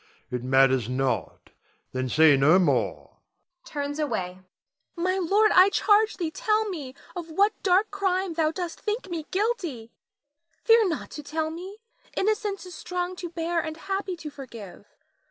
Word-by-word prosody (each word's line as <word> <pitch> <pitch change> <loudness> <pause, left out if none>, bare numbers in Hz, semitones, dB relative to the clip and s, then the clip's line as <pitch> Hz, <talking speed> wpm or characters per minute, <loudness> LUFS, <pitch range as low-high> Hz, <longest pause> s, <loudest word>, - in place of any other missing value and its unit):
It 125 -1 -3
matters 130 -2 +3
not, 130 -5 -2 0.4
then 130 0 -2
say 155 +1 +6
no 145 +6 +5
more 185 - 0 0.5
[turns 290 0 -4
away]. 220 -12 -1
Nina. 185 +1 -16 0.7
My 380 - -1
lord, 410 +4 +3
I 370 +2 +7
charge 415 +2 +3
thee 335 -4 -2
tell 430 +5 +1
me 290 -9 -6 0.2
of 345 -2 -6
what 400 +6 +1
dark 385 +3 +3
crime 380 -2 0
thou 320 -1 +2
dost 340 0 -5
think 420 -3 -3
me 320 -3 -4
guilty! 360 - -2 0.7
Fear 455 -2 +5
not 325 - -4
to 300 - -7
tell 315 +2 -3
me; 370 +5 -8 0.4
innocence 415 -1 0
is 365 - -10
strong 360 +1 -4
to 350 - -5
bear 335 0 -1
and 315 -1 -4
happy 385 +1 -3
to 315 -3 -8
forgive. 225 -9 -11
335 Hz, 155 wpm, -26 LUFS, 235-390 Hz, 0.7 s, I